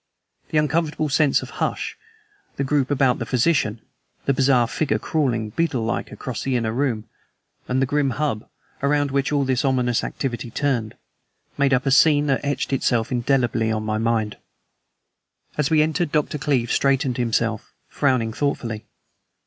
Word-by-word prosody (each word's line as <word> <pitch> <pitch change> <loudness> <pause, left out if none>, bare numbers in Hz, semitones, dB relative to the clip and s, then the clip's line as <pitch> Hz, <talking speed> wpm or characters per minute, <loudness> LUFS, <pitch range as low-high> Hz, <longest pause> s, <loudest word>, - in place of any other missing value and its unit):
The 155 - 0
uncomfortable 155 0 +1
sense 140 0 +3
of - - -9
hush, - - -1 0.6
the 140 - -1
group 135 -1 +1
about 135 -3 +2
the - - -3
physician, 125 -4 +1 0.4
the 140 - +3
bizarre 130 -2 +3
figure 145 +5 0
crawling, 120 -8 -1
beetle 145 -4 0
like, 115 - -2
across 125 -4 -5
the 135 -1 -1
inner 115 -2 0
room, 120 -4 0 0.6
and 125 +1 0
the 135 - +3
grim 145 +1 +1
hub, 145 -8 -2 0.3
around 145 0 +1
which 140 +1 0
all 145 -1 +2
this 130 -2 +1
ominous 125 -3 +1
activity 120 -3 -3
turned, 120 -4 -1 0.6
made 140 -1 +2
up 130 +1 +2
a 135 - +2
scene 145 +1 +5
that 135 -2 0
etched 145 -1 -1
itself 120 -3 +1
indelibly 120 -3 +1
on 110 0 -1
my 110 0 -1
mind. 110 -2 0 1.2
As 150 -2 0
we 155 -2 +4
entered 160 +1 -1
Dr. 150 -1 0
Cleeve 130 -5 0
straightened 135 -2 +1
himself, 115 -2 -1 0.2
frowning 125 -6 0
thoughtfully. 115 -5 -2
135 Hz, 155 wpm, -22 LUFS, 115-145 Hz, 1.2 s, scene